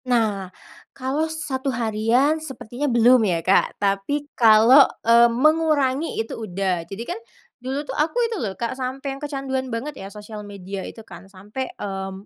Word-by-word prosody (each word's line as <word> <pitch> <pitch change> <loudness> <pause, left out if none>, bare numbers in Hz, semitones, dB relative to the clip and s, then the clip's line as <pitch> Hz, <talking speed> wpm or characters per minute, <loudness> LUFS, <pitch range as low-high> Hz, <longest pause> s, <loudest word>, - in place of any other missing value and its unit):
Nah, 215 -6 0 0.5
kalo 275 +5 -1
1 280 -4 -3
harian 240 +6 +1
sepertinya 265 -1 -5
belum 240 +1 +5
ya, 170 -6 0
Kak. 190 - +3
Tapi 200 +9 -1
kalo, 230 +4 +7 0.2
eee, 235 +1 +6
mengurangi 300 +2 +1
itu 225 0 -3
udah. 185 -3 -1
Jadi 200 +4 -6
kan 355 - -5 0.4
dulu 270 +4 -3
tuh 265 - -6
aku 305 - -1
itu 455 -5 -3
loh, 195 -4 -4
Kak, 235 - -2
sampai 265 +1 -4
yang 275 - -10
kecanduan 270 -3 -3
banget 250 +6 -4
ya, 195 - -7
sosial 210 +1 -9
media 200 -1 -7
itu 225 +3 -9
kan, 180 0 -13
sampai, 205 +7 -6
mmm, 195 0 -6
240 Hz, 160 wpm, -22 LUFS, 205-275 Hz, 0.5 s, kalo